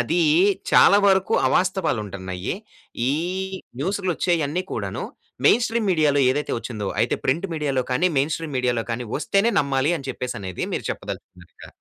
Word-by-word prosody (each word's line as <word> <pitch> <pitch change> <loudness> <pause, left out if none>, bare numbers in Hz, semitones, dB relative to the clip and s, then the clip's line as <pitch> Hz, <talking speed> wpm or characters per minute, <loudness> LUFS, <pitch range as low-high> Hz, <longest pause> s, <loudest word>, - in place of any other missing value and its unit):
అదీ 165 +9 +1 0.5
చాలా 200 - +7
వరకు 190 -1 +2
అవాస్తవాలుంటున్నయి. 105 - -1 0.6
ఈ - - +1 0.7
న్యూస్‌లో 190 +3 -1
వచ్చేయన్నీ 170 -1 0
కూడాను, - - -3 0.4
మెయిన్ 240 - +5
స్ట్రీమ్ 225 -2 -1
మీడియాలో 150 -4 +3
ఏదైతే 145 +3 -2
వచ్చిందో, 110 -3 -5
అయితే 115 - +2
ప్రింట్ 165 +9 +1
మీడియాలో 140 -4 0
కానీ 180 +8 +3
మెయిన్ 145 +3 +1
స్ట్రీమ్ 155 -5 -5
మీడియాలో 120 -3 0
కానీ 120 0 -4
వస్తేనే 195 +9 +1
నమ్మాలి 140 +3 +1
అని, 135 -1 -9
చెప్పేసనేది 100 -8 -4
మీరు - - -3
చెప్పదలుచుకున్నారు 90 -1 -8
ఇక. - - -12
145 Hz, 140 wpm, -23 LUFS, 120-180 Hz, 0.7 s, చాలా